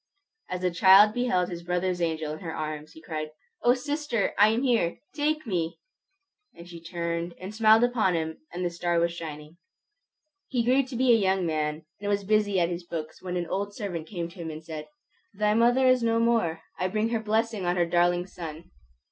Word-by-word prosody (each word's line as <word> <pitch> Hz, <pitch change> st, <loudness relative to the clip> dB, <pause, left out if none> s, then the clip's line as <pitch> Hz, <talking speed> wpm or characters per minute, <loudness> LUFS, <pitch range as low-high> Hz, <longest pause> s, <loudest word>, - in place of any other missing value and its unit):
As 180 Hz, 0 st, -3 dB
the 180 Hz, -1 st, +1 dB
child 195 Hz, +4 st, +7 dB
beheld 230 Hz, -8 st, +1 dB
his 170 Hz, -1 st, -6 dB
brother's 180 Hz, +1 st, -1 dB
angel 160 Hz, -2 st, -1 dB
in 155 Hz, -, -7 dB
her 165 Hz, -3 st, -6 dB
arms, 155 Hz, 0 st, -5 dB
he 160 Hz, -, -14 dB
cried, 155 Hz, -2 st, -4 dB, 0.3 s
"O 245 Hz, +1 st, +4 dB
sister, 285 Hz, -4 st, -1 dB
I 210 Hz, -, +6 dB
am 225 Hz, +4 st, +1 dB
here! 230 Hz, -10 st, +1 dB, 0.2 s
Take 305 Hz, 0 st, 0 dB
me!" 170 Hz, -6 st, -2 dB, 0.8 s
And 170 Hz, +1 st, -12 dB
she 170 Hz, -1 st, -10 dB
turned 170 Hz, 0 st, -3 dB
and 190 Hz, +3 st, -7 dB
smiled 220 Hz, +1 st, +5 dB
upon 225 Hz, -7 st, +2 dB
him, 160 Hz, -1 st, -3 dB
and 180 Hz, +1 st, -3 dB
the 175 Hz, -, -1 dB
star 170 Hz, 0 st, -1 dB
was 170 Hz, 0 st, +1 dB
shining. 155 Hz, -1 st, -8 dB, 0.9 s
He 245 Hz, -3 st, 0 dB
grew 255 Hz, +3 st, +4 dB
to 260 Hz, -1 st, -7 dB
be 255 Hz, +1 st, +3 dB
a -, -, +7 dB
young 190 Hz, -3 st, +1 dB
man, 155 Hz, -1 st, -2 dB
and 205 Hz, 0 st, -3 dB
was 200 Hz, 0 st, +1 dB
busy 205 Hz, -1 st, +2 dB
at 170 Hz, -, +3 dB
his 175 Hz, 0 st, -4 dB
books 160 Hz, -2 st, -6 dB
when 180 Hz, -1 st, -3 dB
an 175 Hz, -, -1 dB
old 200 Hz, +4 st, -3 dB
servant 175 Hz, -7 st, -5 dB
came 175 Hz, -5 st, -4 dB
to 180 Hz, +2 st, -15 dB
him 165 Hz, -1 st, -5 dB
and 155 Hz, 0 st, -8 dB
said, 155 Hz, -2 st, -7 dB, 0.5 s
"Thy 210 Hz, +1 st, +2 dB
mother 240 Hz, +4 st, +4 dB
is 255 Hz, -1 st, +5 dB
no 230 Hz, 0 st, +2 dB
more. 225 Hz, -9 st, +1 dB, 0.2 s
I 185 Hz, -, +1 dB
bring 215 Hz, +4 st, 0 dB
her 230 Hz, -1 st, 0 dB
blessing 220 Hz, -2 st, -1 dB
on 175 Hz, -, +2 dB
her 175 Hz, -1 st, +2 dB
darling 175 Hz, +1 st, +2 dB
son!" 165 Hz, -3 st, -9 dB
180 Hz, 205 wpm, -27 LUFS, 170-220 Hz, 0.9 s, child